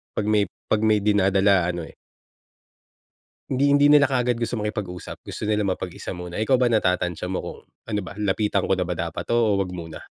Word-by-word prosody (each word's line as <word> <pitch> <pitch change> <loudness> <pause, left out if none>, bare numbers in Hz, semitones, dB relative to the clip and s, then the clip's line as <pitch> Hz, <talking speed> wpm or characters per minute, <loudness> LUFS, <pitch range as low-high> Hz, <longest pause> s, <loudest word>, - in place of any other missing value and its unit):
'pag 105 - -1
may 105 -1 +3 0.2
'pag 110 - +2
may 110 -1 +4
dinadala 100 -3 +3
ano 85 -2 -6
eh - - -15 1.6
hindi 140 +2 +2
hindi 145 0 +5
nila 145 -1 +7
kaagad 125 -3 +1
gusto 115 -1 -2
makipag-usap. 105 -4 -5
Gusto 105 - -5
nila 105 -1 +1
mapag-isa 95 0 -4
muna. 90 -1 -7
Ikaw 125 +5 +2
ba, 125 - +4
natatantya 90 -4 0
mo - - -1
kung - - -8 0.3
ano 105 -2 -1
ba, - - -8
lapitan 105 -1 0
ko 95 - +3
na 90 - 0
ba 90 - -3
dapat 85 -1 -4
'to - - -4
o 110 -4 +3
'wag 95 -2 -2
muna? 80 -3 -8
105 Hz, 195 wpm, -23 LUFS, 90-110 Hz, 1.6 s, nila